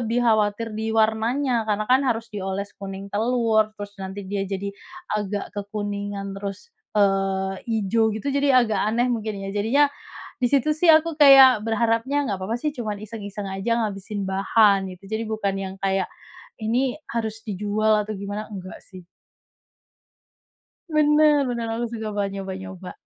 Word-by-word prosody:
lebih 240 +1 0
khawatir 220 0 +1
di 220 +1 -3
warnanya 225 +2 +1
karena 210 0 0
kan 255 +4 +4
harus 230 -4 -1
dioles 200 0 -4
kuning 195 0 -7
telur, 225 -1 +2
terus 205 0 -7
nanti 190 +1 -6
dia 195 0 -3
jadi 200 +1 -3 0.4
agak 205 -1 -3
kekuningan 205 -1 -4
terus, 200 - -7 0.2
eee, 195 -1 +1 0.2
ijo 220 +3 +2
gitu 220 +6 -3
jadi 275 -3 +4
agak 220 -2 -1
aneh 235 +3 +1
mungkin 215 -2 -3
ya. 195 0 -5
Jadinya, 225 +8 +3 0.6
disitu 275 +4 +2
sih 320 +3 +1
aku 320 -1 +5
kayak 270 -4 +9
berharapnya 230 +5 0
enggak 200 -6 -3
apa-apa 220 +5 -2
sih, 300 +4 -2
cuma 220 -7 -4
iseng-iseng 205 -1 -7
saja 195 +4 -2
ngabisin 200 0 -4
bahan 195 +1 +3
gitu. 185 +1 -11
Jadi 220 +3 -3
bukan 215 -3 -1
yang 190 0 -5
kayak, 195 -1 0 0.5
ini 245 +3 0 0.2
harus 220 -1 -3
dijual 210 +1 +1
atau 215 0 -5
gimana, 205 +2 -5
enggak 190 -3 -8
sih. 185 -2 -13 1.8
Bener 300 -1 +4
bener, 235 -2 -2
aku 235 +1 -2
suka 220 -1 -4
banget 200 -1 0
nyoba-nyoba. 190 -1 -7
215 Hz, 150 wpm, -23 LUFS, 195-235 Hz, 1.8 s, kayak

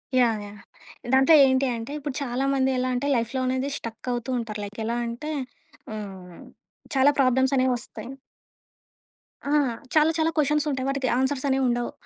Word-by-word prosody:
Yeah! 230 -4 +3
Yeah! 205 0 -12 0.5
దాంట్లో 265 +4 +6
ఏంటి 260 0 +2
అంటే 230 +4 -7
ఇప్పుడు 285 -2 -5
చాలా 255 0 -2
మంది 265 -1 +2
ఎలా 255 0 0
అంటే 250 +3 -1
లైఫ్‌లో 235 +2 -1
అనేది 260 +2 -1
స్టక్ 230 +2 -7
అవుతూ 240 +1 -3
ఉంటారు. 220 -2 -5
లైక్ 205 +2 -10
ఎలా 235 +1 -1
అంటే 245 +7 -5 0.6
ఆహ్, 190 -4 -9 0.6
చాలా 270 +2 +5
ప్రాబ్లమ్స్ 260 +1 +3
అనేవొస్తాయి. 245 -3 -1 1.4
ఆ! 280 - -3 0.4
చాలా, 310 +1 +5
చాలా 320 0 +2
కొషన్స్ 300 +1 +2
ఉంటాయి. 260 -1 -2
వాటికి 275 -1 -1
ఆన్సర్స్ 265 +1 0
అనేవుండవు. 245 -3 +1
260 Hz, 150 wpm, -25 LUFS, 235-270 Hz, 1.4 s, దాంట్లో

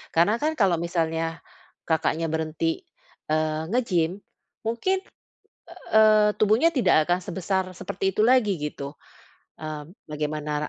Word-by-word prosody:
Karena 190 +7 +4
kan 310 +1 +1
kalau 195 -4 +4
misalnya 165 -1 -2 0.5
Kakaknya 160 0 +1
berhenti, 160 0 -1 0.5
eee, 155 0 0
nge-gym, 185 -8 +1 0.5
mungkin, 305 +13 0 0.9
eee, 215 -1 +6
tubuhnya 220 +10 +4
tidak 185 - +4
akan 175 - +4
sebesar 190 +2 -1
seperti 195 +1 -2
itu - - +2
lagi 230 -6 +3
gitu. 145 -1 -5 0.7
Eee, 155 -1 -6 0.2
bagaimana 150 0 -3
170 Hz, 110 wpm, -25 LUFS, 155-215 Hz, 0.9 s, eee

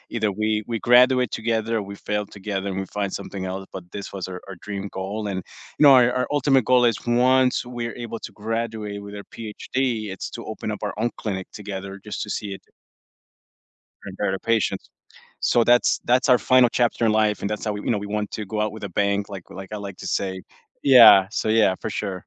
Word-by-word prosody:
either 110 -2 +1
we 110 - +1 0.2
we 115 -1 -2
graduate 125 -1 +6
together, 115 0 -1
or 105 - -2
we - - -7
fail 105 +1 -2
together, 100 -1 -3
and 95 0 -3
we - - -5
find 100 -1 -1
something 95 -2 -5
else, 95 +1 -5
but 95 - -6
this 100 - -6
was 95 -1 -4
our 90 -1 -6
our 95 - -7
dream 100 -1 -4
goal, 105 +3 -3
and 95 - -2 0.4
you - - +5
know, 140 -2 +9
our 125 0 +4
our 125 - 0
ultimate 135 -4 +3
goal 125 -1 +6
is 115 -3 +2
once 125 +1 +3
we're 120 -1 -5
able 115 0 -6
to - - -8
graduate 110 -2 -3
with 100 0 -9
our - - -11
PhD, 110 +3 -7 0.4
it's - - -6
to - - -8
open - - -5
up - - -5
our - - -2
own 120 - +2
clinic 95 -4 -3
together 100 -1 -6
just - - -4
to 105 - -8
see 105 -1 -3
it - - -29 1.4
prepare - - -3
the 95 - -3
patients. 115 +1 0 0.5
So, 120 - +3
that's 120 +1 +4
that's 130 +3 +3
our 125 - +7
final 125 -1 +4
chapter 120 -1 +1
in 110 - +4
life, 110 -1 +2
and 100 - -2
that's 105 +1 -4
how 105 - -1
we 105 - -5
you - - -1
know, 105 - +1
we 100 0 -5
want 105 0 -3
to 105 - -5
go 105 +2 -3
out 105 -1 0
with 110 -1 -10
a - - -6
bang, 100 +2 0
like 95 -3 -9
like 95 +2 -9
I - - -3
like 100 -2 -7
to - - -7
say. 95 -1 -2 0.4
Yeah, 115 -8 +8
so, - - -2
yeah, 110 -4 +4
for 110 - -4
sure. 95 -3 -4
105 Hz, 230 wpm, -23 LUFS, 100-120 Hz, 1.4 s, know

